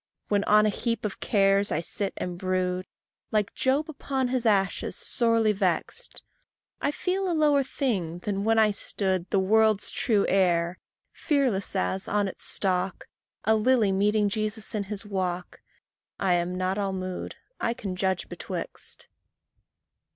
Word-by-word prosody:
When 205 -1 +2
on 210 0 +5
a - - +3
heap 230 +2 -2
of 205 - -4
cares 200 -1 +2
I - - +1
sit 195 +4 -1
and 180 -1 -4
brood, 185 0 -1 0.4
Like 210 -2 0
Job 275 +4 +1
upon 270 -4 -2
his 250 -2 0
ashes, 195 -2 +1
sorely 230 -2 +2
vext, 200 - -2 0.6
I - - +1
feel 370 +5 -1
a 330 - 0
lower 295 -2 +4
thing 205 - -2
than 195 +2 -3
when 225 +1 +2
I 215 -1 +5
stood 190 -3 0
The - - +1
world's 215 +2 +3
true 215 -5 +1
heir, 175 -2 +2 0.3
fearless 255 -11 0
as, 190 0 -1
on 205 -1 +1
its 190 - -6
stalk, 185 -1 -1 0.3
A 220 - +3
lily 220 -1 +3
meeting 205 +2 +2
Jesus 215 +1 -2
in 205 -2 -2
his 205 +1 -4
walk: 185 -3 -3 0.6
I 190 -2 +2
am 175 +1 0
not 185 +2 -1
all 195 -1 -1
mood 185 -1 -5 0.2
I 235 - -1
can 195 -5 -5
judge 190 0 -1
betwixt. - - -7
200 Hz, 150 wpm, -27 LUFS, 185-225 Hz, 0.6 s, on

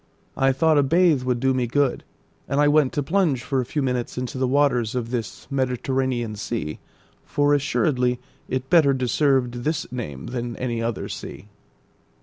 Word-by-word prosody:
I 135 0 +3
thought 155 +3 +3
a - - +6
bathe 165 0 +3
would 125 -1 -1
do 130 +1 +2
me 125 -2 0
good, 140 +1 +1 0.4
and 140 - 0
I 145 - +5
went 145 -2 +4
to 145 - -1
plunge 160 -6 +1
for 130 +1 0
a - - -4
few 145 +3 -2
minutes 125 -2 -2
into 125 +1 -4
the 130 - +1
waters 130 -4 +2
of 120 -2 -3
this 120 -3 -4
mediterranean 130 -3 -1
sea, 100 -8 -4 0.4
for 145 0 +1
assuredly 130 -3 +1 0.3
it 130 0 -2
better 150 -3 +5
deserved 125 -1 +1
this 155 +1 -1
name 75 - -6
than 120 -1 -3
any 120 -2 -2
other 115 -1 -2
sea. 105 - -8
130 Hz, 170 wpm, -23 LUFS, 120-145 Hz, 0.4 s, a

